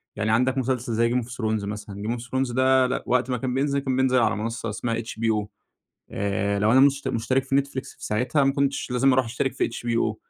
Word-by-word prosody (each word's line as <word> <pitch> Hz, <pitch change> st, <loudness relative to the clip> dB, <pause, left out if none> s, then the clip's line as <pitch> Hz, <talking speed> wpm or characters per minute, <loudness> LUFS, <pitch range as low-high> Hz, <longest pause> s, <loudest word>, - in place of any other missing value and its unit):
يعني 110 Hz, +1 st, -1 dB
عندك 125 Hz, +4 st, +2 dB
مسلسل 125 Hz, -2 st, -1 dB
زي 115 Hz, +1 st, +2 dB
game 125 Hz, -1 st, +1 dB
of -, -, -11 dB
thrones 110 Hz, -4 st, -2 dB
مثلًا 105 Hz, -1 st, -6 dB
game 120 Hz, +1 st, -1 dB
of -, -, -8 dB
thrones 130 Hz, -1 st, -2 dB
ده 130 Hz, 0 st, +4 dB
لأ 130 Hz, -, -2 dB
وقت 125 Hz, +1 st, +1 dB
ما 125 Hz, -, 0 dB
كان 125 Hz, +1 st, -3 dB
بينزل 140 Hz, +1 st, +1 dB
كان 130 Hz, -2 st, -2 dB
بينزل 130 Hz, -1 st, +3 dB
على 115 Hz, -, +2 dB
منصة 115 Hz, +1 st, -3 dB
اسمها 115 Hz, +2 st, -2 dB
HBO 110 Hz, -2 st, -2 dB, 0.6 s
آآ، 100 Hz, 0 st, -1 dB
لو 105 Hz, +2 st, +3 dB
أنا 130 Hz, -, +6 dB
مشت 140 Hz, 0 st, +3 dB
مشترك 125 Hz, +4 st, 0 dB
في 135 Hz, 0 st, 0 dB
Netflix 140 Hz, -1 st, -2 dB
في -, -, -10 dB
ساعتها 130 Hz, +6 st, +1 dB
ما 135 Hz, -, +3 dB
كنتش 140 Hz, -2 st, -1 dB
لازم 130 Hz, +2 st, +3 dB
أروح 130 Hz, 0 st, +3 dB
أشترك 125 Hz, +3 st, -2 dB
في -, -, -1 dB
HBO 115 Hz, -2 st, -1 dB
125 Hz, 225 wpm, -24 LUFS, 110-130 Hz, 0.6 s, أنا